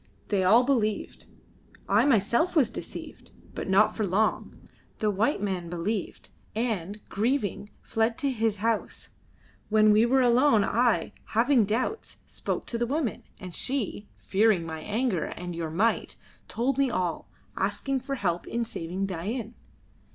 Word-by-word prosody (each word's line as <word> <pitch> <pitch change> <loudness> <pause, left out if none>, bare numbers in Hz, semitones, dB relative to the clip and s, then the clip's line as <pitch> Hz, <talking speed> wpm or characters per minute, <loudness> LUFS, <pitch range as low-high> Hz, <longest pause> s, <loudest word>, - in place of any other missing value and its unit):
They 200 -3 +2
all 225 +7 +6
believed; 230 -6 -1 0.6
I 210 +5 +4
myself 235 - +2
was 260 -8 +4
deceived, - - -8 0.2
but - - -5
not 200 +3 +4
for 220 - -1
long. 205 +3 -1 0.3
The 215 -1 +1
white 205 +3 0
man 185 -4 -2
believed, 175 +4 -4 0.2
and, 215 -4 -2
grieving, 210 -2 -1
fled 225 +1 0
to 280 -2 0
his 225 -3 0
house. 230 -2 -2 0.6
When 215 0 +5
we 215 +3 +5
were 265 +2 +4
alone 245 -2 +4
I, 235 +2 +1 0.2
having 240 -1 +4
doubts, 255 - -2
spoke - - -4
to 235 - -3
the 240 - 0
woman, 280 -3 -1 0.2
and 185 -2 -8
she, 235 -5 -1
fearing 200 -3 +2
my 160 -1 -5
anger 210 -1 -1
and 175 -1 -6
your 165 -1 -3
might, 205 +9 0 0.3
told 255 +3 -1
me 275 -1 +3
all, 180 -7 -2 0.3
asking 275 -1 -1
for 275 +2 -4
help 175 -7 -2
in 235 0 -2
saving 185 -3 -4
Dain." 205 +6 -4
220 Hz, 145 wpm, -27 LUFS, 195-245 Hz, 0.6 s, all